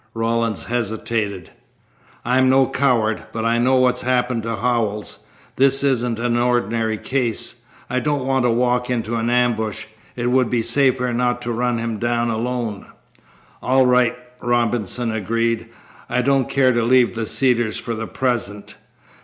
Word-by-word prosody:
Rawlins 115 -1 -1
hesitated. 110 -5 -3 0.7
"I'm 130 +2 +3
no 135 0 +5
coward, 115 -6 0
but 110 0 -3
I 115 +1 +2
know 130 +2 +3
what's 125 -1 +3
happened 125 -1 0
to 115 +1 -3
Howells. 110 -2 -2 0.3
This 135 +1 +3
isn't 125 -4 +1
an 120 0 0
ordinary 115 -2 0
case. 120 -1 -2 0.3
I 125 +1 -1
don't 145 -2 -1
want 135 -1 +1
to - - +3
walk 125 +1 +1
into 120 -2 -2
an 115 +1 -1
ambush. 120 -3 0 0.3
It 120 0 -1
would 130 -2 +2
be 120 -2 0
safer 125 0 +2
not 120 0 0
to 120 - -3
run 120 +1 0
him 115 -2 -3
down 120 0 0
alone." 115 -2 -3 0.7
"All 130 0 +3
right," 125 -1 +3 0.3
Robinson 120 -1 0
agreed, 115 +2 -1 0.4
"I 125 +1 0
don't 135 -1 +2
care 130 -2 +3
to 120 -1 +1
leave 125 +1 +3
the 115 -1 -3
Cedars 120 -4 +1
for 115 - -4
the 115 0 -5
present. 110 -6 -3
120 Hz, 155 wpm, -20 LUFS, 115-125 Hz, 0.7 s, no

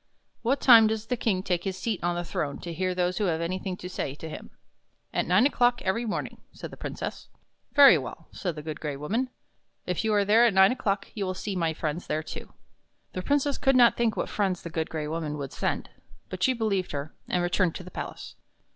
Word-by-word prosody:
What 265 +4 +1
time 230 -4 +8
does 220 0 -2
the 250 - -1
King 210 -6 0
take 180 -3 -1
his 190 -1 -3
seat 215 -3 -3
on 175 0 +1
the 175 - -2
throne 145 -4 -3
to 170 - -5
hear 185 +2 -1
those 180 0 0
who 210 - +1
have 165 -3 0
anything 185 +2 -3
to 180 - -7
say 140 -6 -4
to 160 - -8
him?" 155 - -8 0.3
" - - -45
At - - 0
nine - - +5
o'clock 245 -3 +3
every 200 +5 0
morning," 210 - -4
said - - -9
the - - -9
Princess. - - -6 0.2
" - - -43
Very 275 - +9
well," 135 +5 -8
said 175 -4 -3
the 150 - -7
Good 155 -1 -5
Gray 150 -2 -3
Woman. 225 - -1 0.3
" - - -48
If 180 +2 -1
you 220 - +1
are 205 -1 +3
there 220 +4 +5
at 210 - 0
nine 190 +1 +7
o'clock, 205 -5 -1
you 205 - -3
will 185 -1 -2
see 200 +1 -4
my 165 -3 0
friends 155 +2 -3
there, 155 +1 -1
too." - - -8 0.6
The 185 - -3
Princess 285 +5 +1
could 270 -1 +3
not 240 -2 +6
think 230 -3 0
what - - -1
friends 190 -4 -1
the 170 - -6
Good 160 0 -2
Gray 155 -2 -3
Woman 155 -1 -3
would 140 -2 -6
send; - - -2 0.4
but 185 0 -6
she 260 - +4
believed 205 -8 -1
her, 145 +2 -4
and 180 - 0
returned 175 -1 +1
to 185 - -6
the 180 - -11
palace. - - -7
185 Hz, 240 wpm, -27 LUFS, 165-220 Hz, 0.6 s, Very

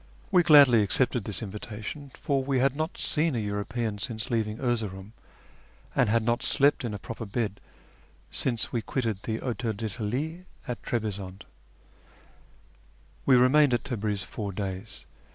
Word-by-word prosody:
We 180 - +6
gladly 145 -9 +7
accepted 120 +2 +1
this 105 0 -2
invitation, 110 +7 -7
for 140 -4 0
we 135 0 0
had 135 +1 +2
not 155 +2 -3
seen 155 -2 +1
a - - 0
European 105 +1 -2
since 115 +2 -3
leaving 110 -2 0
Erzeroum, 110 -5 -2 0.8
and - - +3
had 115 +1 +2
not 120 +1 +1
slept 140 0 +3
in 110 -4 -3
a - - -3
proper 115 +3 -7
bed 105 -1 -2 0.7
since 120 -4 +1
we 120 - -1
quitted 110 -4 -2
the 110 +1 -2
Hotel 120 -2 -2
d'ltalie 120 - -4 0.2
at 125 -2 -4
Trebizonde. 100 -4 -4 1.8
We 135 - +7
remained 130 +2 +5
at 120 - -2
Tabriz 105 -6 -2
four 100 +1 -5
days. 95 +1 -5
115 Hz, 145 wpm, -27 LUFS, 105-130 Hz, 1.8 s, gladly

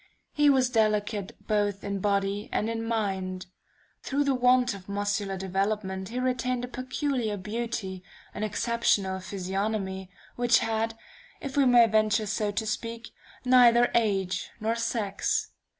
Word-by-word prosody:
He 295 -1 +4
was 260 -2 +3
delicate 210 -3 0
both 205 -2 0
in 200 -1 -3
body 200 +1 0
and 220 +2 0
in 225 0 -3
mind. 190 -5 -2 0.6
Through 280 +1 0
the 280 -1 +2
want 250 -1 +3
of 195 -1 -11
muscular 200 -1 -1
development 190 0 -2
he 245 +2 -3
retained 250 -1 -1
a - - -10
peculiar 255 -3 -2
beauty, 210 -2 -4 0.3
an - - -6
exceptional 215 -3 0
physiognomy, 190 0 -3 0.3
which 245 0 +4
had, 225 0 -1 0.4
if 275 -2 -6
we 280 -1 +4
may 240 -1 +7
venture 215 0 +2
so 210 +1 -1
to 220 +2 -2
speak, 230 +2 -4 0.4
neither 245 -1 +6
age 195 -5 0
nor 220 +1 0
sex. 225 -4 -1
215 Hz, 135 wpm, -27 LUFS, 195-240 Hz, 0.6 s, may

